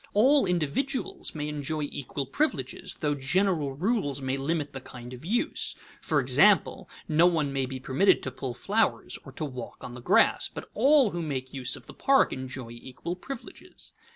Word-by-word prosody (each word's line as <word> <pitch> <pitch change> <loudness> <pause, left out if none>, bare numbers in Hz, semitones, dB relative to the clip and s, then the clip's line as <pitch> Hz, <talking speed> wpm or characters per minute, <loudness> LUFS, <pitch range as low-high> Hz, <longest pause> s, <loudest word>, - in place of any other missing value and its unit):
All 270 +7 +5
individuals 180 - -1
may 150 -1 -3
enjoy 150 +1 -3
equal 140 -1 -4
privileges, 295 - -2
though 150 -2 +2
general 150 +1 +1
rules 160 - 0
may 130 0 -1
limit 145 +2 -2
the 135 - -6
kind 125 -1 -10
of 125 +2 -10
use; 220 +8 -1 0.3
for - - +1
example: - - +4 0.2
no 165 +1 +5
one 155 -5 +1
may 135 -1 0
be 130 0 -5
permitted 135 +10 +3
to - - -3
pull 125 -3 -5
flowers 215 - 0
or 135 - -9
to 155 - -3
walk 130 -3 -8
on 120 - -7
the 125 - -9
grass, - - +4
but - - -9
all 270 -1 +5
who 175 - -3
make 130 -5 -4
use 130 -2 -2
of - - -13
the - - -11
park 275 0 +3
enjoy 130 -2 -6
equal 130 +8 -6
privileges. 270 +9 -10
150 Hz, 180 wpm, -28 LUFS, 130-190 Hz, 0.3 s, All